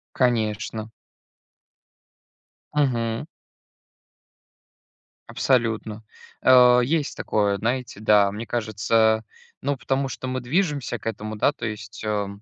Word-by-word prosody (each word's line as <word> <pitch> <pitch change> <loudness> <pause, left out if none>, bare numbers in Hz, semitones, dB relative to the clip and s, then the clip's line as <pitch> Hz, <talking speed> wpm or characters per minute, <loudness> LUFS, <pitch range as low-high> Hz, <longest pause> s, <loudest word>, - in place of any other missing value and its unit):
Конечно. 110 -3 0 1.8
Мгм. 120 -5 0 2.0
Абсолютно. 115 -4 0 0.4
А, 125 -1 +7
есть 145 +4 0
такое, 100 -2 0
знаете, 120 +1 -2
да. 105 -2 +4
Мне 110 +3 -6
кажется, 110 0 +1 0.4
ну 140 +1 -1
потому 135 +1 -1
что 130 - -6
мы 130 0 -3
движемся 140 -3 -1
к - - -18
этому 110 -1 -4
да 125 - +2
то 120 - -6
есть, 110 0 -7
а 105 -2 -1
115 Hz, 100 wpm, -24 LUFS, 110-130 Hz, 2.0 s, А